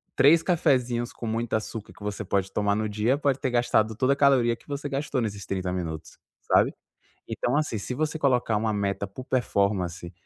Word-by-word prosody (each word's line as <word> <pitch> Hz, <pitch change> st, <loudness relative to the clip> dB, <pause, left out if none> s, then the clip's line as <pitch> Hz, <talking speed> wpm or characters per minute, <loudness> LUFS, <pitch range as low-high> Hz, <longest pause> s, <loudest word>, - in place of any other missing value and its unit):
três 145 Hz, +5 st, +6 dB
cafezinhos 125 Hz, -8 st, +1 dB
com 115 Hz, -, -7 dB
muito 115 Hz, +1 st, -2 dB
açúcar 110 Hz, 0 st, -4 dB
que -, -, -20 dB
você 105 Hz, +1 st, -3 dB
pode 95 Hz, 0 st, -1 dB
tomar 100 Hz, -1 st, +1 dB
no 110 Hz, +1 st, -1 dB
dia 110 Hz, +6 st, +1 dB
pode 140 Hz, -2 st, 0 dB
ter 130 Hz, -, -1 dB
gastado 110 Hz, -2 st, +2 dB
toda 130 Hz, +4 st, +2 dB
a -, -, -2 dB
caloria 130 Hz, -4 st, +4 dB
que -, -, -24 dB
você 145 Hz, 0 st, -4 dB
gastou 140 Hz, -1 st, -2 dB
nesses 100 Hz, -3 st, -4 dB
30 95 Hz, -2 st, -2 dB
minutos, 80 Hz, -3 st, -5 dB, 0.2 s
sabe? -, -, +3 dB, 0.6 s
Então 125 Hz, +3 st, -1 dB
assim, 150 Hz, -7 st, 0 dB
se 115 Hz, +5 st, -4 dB
você 155 Hz, +3 st, -1 dB
colocar 125 Hz, -6 st, +2 dB
uma 110 Hz, +1 st, 0 dB
meta 100 Hz, -1 st, -1 dB
por 125 Hz, +6 st, -9 dB
performance, 100 Hz, -8 st, -1 dB
115 Hz, 195 wpm, -26 LUFS, 100-135 Hz, 0.6 s, três